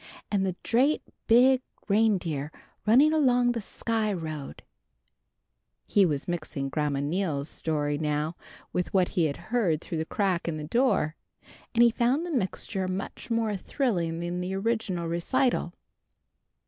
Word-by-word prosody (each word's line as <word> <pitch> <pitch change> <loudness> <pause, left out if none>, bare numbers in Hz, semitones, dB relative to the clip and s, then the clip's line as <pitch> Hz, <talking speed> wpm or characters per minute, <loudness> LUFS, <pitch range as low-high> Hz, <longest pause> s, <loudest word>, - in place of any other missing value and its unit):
An' 200 -2 +2
the 190 -2 -1
drate 265 +6 +2 0.2
big 250 +3 +6 0.3
reindeer 185 -9 +1 0.4
runned 275 +8 +6
along 250 -5 +3
the 235 -1 -2
Sky 220 +1 -1
Road" 155 -6 -5 1.2
he 200 -3 +4
was 145 -4 -2
mixing 155 -5 -3
Grandma 145 -1 -1
Neal's 150 -2 -1
story 145 -2 -1
now 150 +1 -1 0.4
with 180 +2 -2
what 185 -2 +4
he 175 -4 +1
had 140 -2 -2 0.2
heard 185 -11 +2
through 165 -1 -5
the 160 - -1
crack 190 -2 0
in 160 -2 -2
the 150 - -5
door, 160 - +1 0.6
and 235 - +6
he 235 - +6
found 250 +8 +1
the 350 - -4
mixture 190 - -2
much 185 +5 -5
more 225 -2 0
thrilling 180 - -1
than 175 +1 -3
the 185 +1 -3
original 195 -5 -1
recital. 175 +5 +1
185 Hz, 145 wpm, -27 LUFS, 160-230 Hz, 1.2 s, big